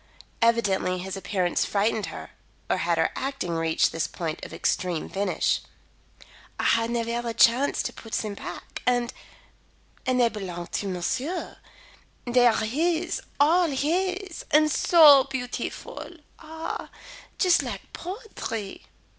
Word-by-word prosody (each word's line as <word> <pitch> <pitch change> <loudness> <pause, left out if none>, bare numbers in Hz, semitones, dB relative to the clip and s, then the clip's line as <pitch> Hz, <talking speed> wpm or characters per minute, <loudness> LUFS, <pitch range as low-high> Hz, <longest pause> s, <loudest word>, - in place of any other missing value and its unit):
Evidently 205 -6 +2
his 190 +1 -5
appearance 190 -2 0
frightened 210 +1 0
her - - -8 0.4
or - - +2
had - - 0
her - - +2
acting 270 -10 -3
reached 165 0 +2
this 165 - -1
point 165 -2 -5
of - - -7
extreme 175 -4 -1
finish? 200 +1 0 1.0
"I - - -1
had 230 0 +3
nevaire 235 0 -1
the 235 -1 -4
chance 245 +5 +4
to - - -4
put 225 - -12
them 215 -2 -1
back. - - -8
And 245 0 +1 0.9
and 255 -1 +2
they 240 - +5
belong 180 -5 -6
to 200 - -2
monsieur. 250 - -3 0.7
They 245 0 +5
are 220 -1 +2
his 330 +8 0 0.2
all 335 +5 +5
his 365 +6 -1
and 305 0 +4
so 295 -4 +7
beautiful! 260 +5 -5 0.3
Ah, 320 0 -6 0.5
just 365 -3 +4
like - - -7
poetry." 345 - -6
240 Hz, 130 wpm, -26 LUFS, 200-310 Hz, 1.0 s, so